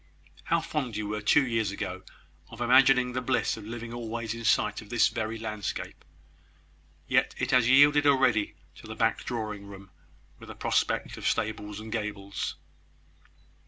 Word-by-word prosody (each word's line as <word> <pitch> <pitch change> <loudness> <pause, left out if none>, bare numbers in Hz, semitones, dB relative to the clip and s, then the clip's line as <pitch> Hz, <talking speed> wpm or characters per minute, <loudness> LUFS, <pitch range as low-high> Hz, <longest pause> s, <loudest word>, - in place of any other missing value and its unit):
"How 170 0 +1
fond 130 -9 -3
you 105 -1 -3
were, 105 0 -3
two 135 +7 +4
years 115 -4 0
ago, 95 -2 -5 0.5
of 115 - -12
imagining 125 +1 +5
the 125 - -1
bliss 130 +1 0
of 110 - -10
living 115 0 -6
always 115 -1 -4
in 115 0 -7
sight 110 - +2
of 105 - -14
this 120 0 +3
very 110 0 -3
landscape! 105 -2 -5 1.0
Yet - - +2
it - - -1
has 125 -2 +4
yielded 145 +2 +6
already 130 - +3 0.2
to - - -12
the 110 - -7
back 115 0 +1
drawing 105 -4 -4
room, 100 -1 -12 0.5
with - - -12
a - - -8
prospect - - -1
of - - -3
stables 105 -1 -2
and 110 0 -9
gables." 105 -3 -4
115 Hz, 160 wpm, -28 LUFS, 105-125 Hz, 1.0 s, yielded